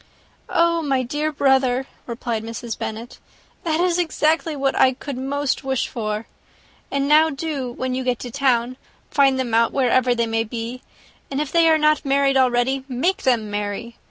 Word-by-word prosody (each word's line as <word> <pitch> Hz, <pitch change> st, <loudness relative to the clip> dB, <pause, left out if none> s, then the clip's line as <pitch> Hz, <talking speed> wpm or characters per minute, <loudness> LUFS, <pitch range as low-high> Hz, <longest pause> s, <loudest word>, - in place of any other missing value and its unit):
"Oh, 335 Hz, 0 st, +2 dB
my 270 Hz, -4 st, 0 dB
dear 295 Hz, +5 st, -2 dB
brother," 265 Hz, -2 st, +2 dB, 0.2 s
replied 235 Hz, -2 st, -3 dB
Mrs. 230 Hz, 0 st, -5 dB
Bennet, 225 Hz, +3 st, -6 dB, 0.4 s
"that 320 Hz, -1 st, 0 dB
is 355 Hz, 0 st, +2 dB
exactly 320 Hz, -1 st, +1 dB
what 275 Hz, -1 st, 0 dB
I 260 Hz, -, +4 dB
could 275 Hz, +1 st, -7 dB
most 280 Hz, +2 st, -2 dB
wish 265 Hz, -2 st, -1 dB
for. 215 Hz, -2 st, -4 dB, 0.6 s
And 280 Hz, 0 st, -1 dB
now 310 Hz, +2 st, +5 dB
do, 275 Hz, -4 st, -4 dB
when 255 Hz, +1 st, -3 dB
you 260 Hz, +1 st, -2 dB
get 250 Hz, -1 st, 0 dB
to 245 Hz, -, -6 dB
town, 255 Hz, -2 st, +1 dB, 0.3 s
find 270 Hz, -2 st, +3 dB
them 245 Hz, -3 st, -2 dB
out, 230 Hz, 0 st, +3 dB
wherever 255 Hz, -2 st, +2 dB
they 235 Hz, -1 st, +1 dB
may 225 Hz, 0 st, 0 dB
be; 235 Hz, +2 st, -6 dB, 0.5 s
and 275 Hz, -, -2 dB
if 300 Hz, -2 st, -2 dB
they 335 Hz, -1 st, +4 dB
are 320 Hz, -, +5 dB
not 305 Hz, 0 st, +2 dB
married 275 Hz, -1 st, +2 dB
already, 260 Hz, +1 st, +2 dB
make 280 Hz, +9 st, 0 dB
them 230 Hz, -5 st, +1 dB
marry. 205 Hz, +3 st, -4 dB
260 Hz, 175 wpm, -21 LUFS, 240-290 Hz, 0.6 s, now